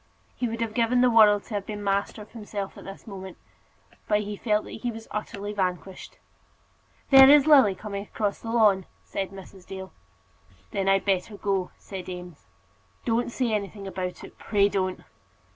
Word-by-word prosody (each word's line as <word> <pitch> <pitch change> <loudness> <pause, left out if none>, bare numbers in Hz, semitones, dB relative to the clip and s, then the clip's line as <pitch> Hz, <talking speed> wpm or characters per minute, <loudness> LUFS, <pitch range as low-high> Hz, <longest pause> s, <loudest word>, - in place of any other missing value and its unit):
He 245 - -1
would 230 +1 -4
have 225 -2 -2
given 240 +1 +2
the 250 -1 +5
world 210 -3 +6
to 230 - -10
have 200 -1 -3
been 210 -1 -5
master 200 +2 -1
of 205 - -19
himself 205 -3 -6
at - - -12
this 195 0 -10
moment, 190 -4 -9 0.7
but 210 0 +2
he 210 0 -5
felt 210 0 0
that - - -9
he 245 - -1
was 225 -1 -8
utterly 205 -1 -4
vanquished. 185 -1 -4 0.9
"There 270 0 +10
is 290 -1 +7
Lily 270 -11 +6
coming 200 0 -5
across 205 -1 -2
the 225 - -7
lawn," 210 -5 +3 0.2
said 195 -1 -4
Mrs. 190 -1 -13
Dale. 190 -1 -8 0.8
"Then 195 -1 0
I'd 195 -1 +3
better 195 +1 0
go," 195 -3 -1
said 190 -2 -8
Eames. 180 - -9 0.6
"Don't 235 +1 0
say 240 -2 -1
anything 200 -1 -3
about 185 -1 -5
it; - - -13
pray 200 -1 +2
don't." 185 -2 -2
205 Hz, 175 wpm, -26 LUFS, 195-225 Hz, 0.9 s, There